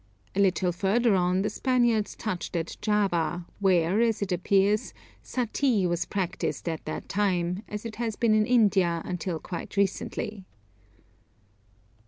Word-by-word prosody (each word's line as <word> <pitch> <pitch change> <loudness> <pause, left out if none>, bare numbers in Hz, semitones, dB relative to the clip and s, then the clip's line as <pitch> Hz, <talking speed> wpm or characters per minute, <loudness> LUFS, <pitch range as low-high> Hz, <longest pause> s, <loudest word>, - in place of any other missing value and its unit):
A - - 0
little 185 -2 +3
further 205 +6 +2
on 180 0 +2
the 210 - 0
Spaniards 240 -5 +1
touched 185 -4 -4
at 165 -1 -2
Java, 180 -5 0
where, 185 +1 +3
as 225 -3 +1
it 195 - -4
appears, 195 +3 +2 0.3
suttee 245 -3 0
was 175 0 -1
practised 180 -3 -3
at 160 -2 -3
this 155 - -4
time, 185 -2 0
as 210 +2 -6
it 225 -2 -6
has 230 -2 -2
been 230 0 +2
in 215 0 +3
India 195 -8 +3
until 180 -1 -3
quite 175 +4 -7
recently. 200 +1 -1
195 Hz, 140 wpm, -27 LUFS, 180-215 Hz, 0.3 s, little